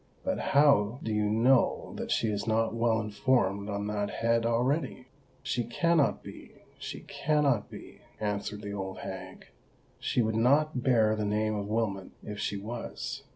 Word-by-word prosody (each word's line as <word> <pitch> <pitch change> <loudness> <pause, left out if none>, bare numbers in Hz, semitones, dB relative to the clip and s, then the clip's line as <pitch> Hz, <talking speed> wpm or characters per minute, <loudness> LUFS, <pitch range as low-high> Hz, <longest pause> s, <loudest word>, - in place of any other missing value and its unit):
"But - - -1
how 130 -5 +3
do 110 - -2
you 105 0 +1
know 120 +4 +2
that - - -5
she 115 - +1
is 105 +1 -3
not 110 0 +1
well 115 -1 +2
informed 105 -2 0
on 100 0 -2
that 105 -1 -2
head 115 0 +1
already?" 125 +3 0 0.4
"She 120 - -1
cannot 160 +5 +1
be—she - - -10
cannot 145 -7 0
be," - - -11 0.2
answered 105 0 -3
the 100 0 -5
old 95 -1 -5
hag; - - -8 0.5
"she 120 - +1
would 110 0 0
not 135 +4 +3
bear 110 -4 +3
the 110 - -2
name 105 +1 0
of 100 -1 -3
Wilmot 105 -4 -1
if 105 -1 -6
she 100 - -2
was. 115 +4 -5
110 Hz, 155 wpm, -29 LUFS, 105-125 Hz, 0.5 s, how